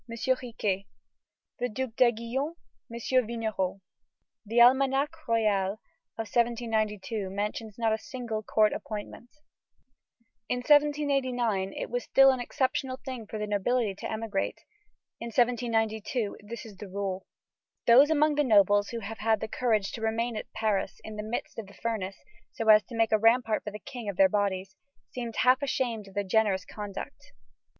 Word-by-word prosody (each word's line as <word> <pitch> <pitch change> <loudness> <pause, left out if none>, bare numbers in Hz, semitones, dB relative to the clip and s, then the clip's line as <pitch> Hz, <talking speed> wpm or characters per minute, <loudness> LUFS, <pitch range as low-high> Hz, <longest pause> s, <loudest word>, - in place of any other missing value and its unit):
Riquet; 230 -5 -1 0.7
the 245 +1 -1
Duke 240 +1 -4
d'Aiguillon, 245 +6 +1 0.4
M. 250 +2 +1
Vignerot. 215 -5 -2 0.6
The 225 +2 -4
Almanach 270 +5 +4
royal 210 -4 +2 0.4
of 225 - -3
1792 220 -3 -1
mentions 210 +2 -4
not 225 -2 +1
a 220 - -1
single 240 -5 -5
court 215 0 +2
appointment. 215 +3 -7 1.2
In 250 - +1
1789, 260 -7 +2
it - - -5
was 245 0 -1
still 270 0 +6
an 260 - -2
exceptional 260 +1 -1
thing 250 -5 -6
for 215 - -5
the 210 - -2
nobility 210 +2 0
to 190 - -6
emigrate. 220 -2 -2 0.6
In 235 - -5
1792, 230 -2 0
it 230 +4 -8
is 210 -4 -12
the 200 0 -9
rule. 195 -1 -4 0.6
Those 260 +5 +7
among 305 -1 +3
the 295 0 +2
nobles 205 -4 +4
who 235 -1 -5
have 220 +2 -7
had 220 0 +2
the 220 - -4
courage 220 -4 0
to 230 - -7
remain 225 +1 -1
at 215 - -6
Paris 215 -3 -1
in 220 - -8
the 210 - -4
midst 220 +2 -4
of 215 - -7
the 200 - -15
furnace, 210 -5 -3 0.4
so 225 - -4
as 215 0 +9
to 235 - -9
make 225 -1 +2
a 215 - +4
rampart 225 0 +3
for - - -2
the 210 - -7
King 235 -1 -7
of 195 - -5
their 190 -1 +6
bodies, 195 -1 -1 0.4
seem 240 -2 -4
half 250 +4 +3
ashamed 240 -6 -1
of 195 - -15
their 205 - 0
generous 200 -1 +1
conduct. 205 -2 -8
225 Hz, 160 wpm, -28 LUFS, 210-245 Hz, 1.2 s, as